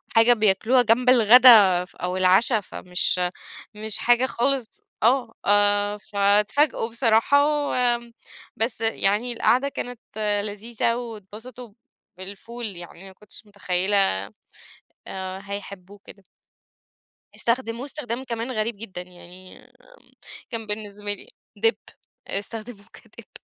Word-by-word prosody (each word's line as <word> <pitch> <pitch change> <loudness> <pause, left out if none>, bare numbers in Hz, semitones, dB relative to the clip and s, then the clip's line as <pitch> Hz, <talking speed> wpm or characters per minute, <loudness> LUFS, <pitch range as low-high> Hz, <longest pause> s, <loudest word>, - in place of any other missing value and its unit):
حاجة 225 +2 +6
بياكلوها 220 +3 +2
جنب 245 +2 +2
الغدا 220 -6 +7
ف - - -22
أو 180 +1 -4
العشا، 190 +5 +4
فمش 180 -1 -2 0.6
مش 215 0 -2
حاجة 240 +1 +3
خالص 260 -1 -1 0.3
آه، 240 -1 +2
آآ 205 0 +2
فتفاجؤوا 210 +6 +1
بصراحة 235 +4 +3 0.2
و - - -2 0.8
بس 225 +1 -1
يعني 225 +2 +1
القعدة 255 +4 +2
كانت 245 -3 -7 0.5
لذيذة 225 +3 -2
واتبسطوا 230 0 -9 0.4
بالفول 205 +5 -6
يعني 175 +2 -11
ما 190 - -13
كنتش 210 +3 -11
متخيلة، 200 -1 0 1.1
آآ، 190 0 -6
هيحبوه 200 -1 -9
كده. 200 - -15 1.1
استخدموه 235 +1 -2
استخدام 265 -4 -5
كمان 235 0 -4
غريب 220 -2 -2
جدًا، 195 -4 -7
يعني 180 +1 -15 0.9
كان 225 -3 -6
بالنسبة 205 -1 -4
لي 405 - -11 0.4
dip، 455 - +1 0.5
استخدموه 215 +1 -6
كdip، - - -16
215 Hz, 110 wpm, -23 LUFS, 200-240 Hz, 1.1 s, الغدا